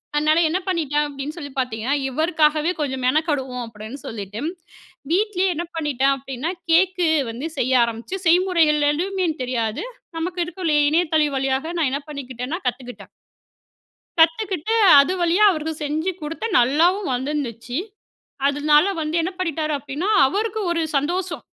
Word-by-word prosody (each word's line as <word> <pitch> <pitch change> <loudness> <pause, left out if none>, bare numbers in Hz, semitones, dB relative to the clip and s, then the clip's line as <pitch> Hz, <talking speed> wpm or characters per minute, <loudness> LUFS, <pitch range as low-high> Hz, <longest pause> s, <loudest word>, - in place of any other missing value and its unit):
அதுனால 305 +2 +3
என்ன 350 +4 0
பண்ணிட்டேனு 295 -4 -1
சொல்லி 290 -4 -6
பாத்தீங்கணா, 250 -1 -2 0.2
இவருக்காகவே 310 +2 +2
கொஞ்சம் 265 -3 -2
மெனக்கடுவோம் 265 -4 0
அப்டீன்னு, 220 +4 -9
சொல்லிட்டு 210 -1 -6 0.7
வீட்லயே 385 0 +1
என்ன 340 +3 -3
பண்ணிட்டேன் 275 -4 +1
அப்டீன்னா, 270 +4 -4 0.2
கேக்கு 360 +1 +3 0.2
வந்து 245 +7 -5
செய்ய 255 -1 +3
ஆரமிச்சி, 235 +10 -4
செய்முறைகள் 330 -4 +3
ஏதுமே 370 +4 -1 0.2
தெரியாது. 235 - -2 0.3
நமக்கு 355 +2 -3
இருக்குல்ல. 340 -3 -1
இணையத்தளம் 315 -1 +2
வழியாக, 270 +5 -1
நான் 300 -5 +2
என்ன 280 +2 -2
பண்ணிக்கிட்டேன்னா? 265 +2 -5
கத்துக்கிட்டேன். 245 0 -5 1.1
கத்துக்குட்டு, 365 +4 +2 0.3
அது 280 +6 +2
வழியா 345 +5 +3
அவருக்கு 320 -2 -3
செஞ்சு 310 +5 -1
குடுத்தேன், 330 +7 -2
நல்லாவும் 335 +9 +2
வந்துருந்துச்சு. 250 -2 -3 0.7
அதுனால 295 +2 +4 0.2
வந்து 310 +1 -2
என்ன 350 +3 -2
பண்ணிட்டார் 315 -3 -1
அப்டீன்னா, 290 +7 -4 0.2
அவருக்கு 430 +7 -2
ஒரு 335 -1 0 0.2
சந்தோஷம். 345 +5 -2
300 Hz, 125 wpm, -22 LUFS, 265-345 Hz, 1.1 s, அதுனால